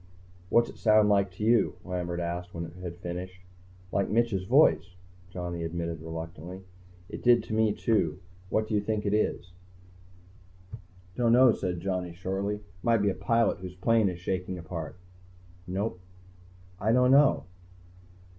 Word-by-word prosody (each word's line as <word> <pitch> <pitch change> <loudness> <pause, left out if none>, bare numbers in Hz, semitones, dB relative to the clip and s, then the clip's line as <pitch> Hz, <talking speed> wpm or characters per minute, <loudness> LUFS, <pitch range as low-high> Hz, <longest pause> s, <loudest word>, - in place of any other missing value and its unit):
"What's 120 +3 +4
it - - -11
sound 110 -1 +5
like 100 -2 +3
to 100 - -6
you?" 115 +2 +3
Lambert 90 -1 -3
asked 85 +1 -4
when 85 0 -4
it 80 - -11
had 85 -1 -6
finished. 90 +1 -6 0.5
"Like 100 - 0
Mitch's 110 -4 +1
voice," 120 -6 +3 0.3
Johnny 90 -2 -5
admitted 85 -1 -4
reluctantly. 85 +3 -7 0.4
"It - - -8
did 120 -2 +5
to - - -6
me, 110 -1 +3
too. 100 -7 0 0.3
What 110 +2 0
do 110 - -4
you 105 - +2
think 105 0 -2
it 100 - +1
is?" 105 -3 0 1.6
"Don't 115 -2 +3
know," 125 0 +7
said 90 -5 -3
Johnny 90 -3 -3
shortly. 95 +3 -3 0.2
"Might 115 -2 +2
be 100 - +3
a - - -3
pilot 115 +4 +1
whose 90 -1 -8
plane 110 +2 +2
is 90 - -5
shaking 90 +1 -3
apart." 80 -2 -6 0.7
"No." 95 +3 -2 0.8
"I 110 +3 +1
don't 125 +1 +4
know." 140 +1 +5
95 Hz, 155 wpm, -28 LUFS, 90-110 Hz, 1.6 s, know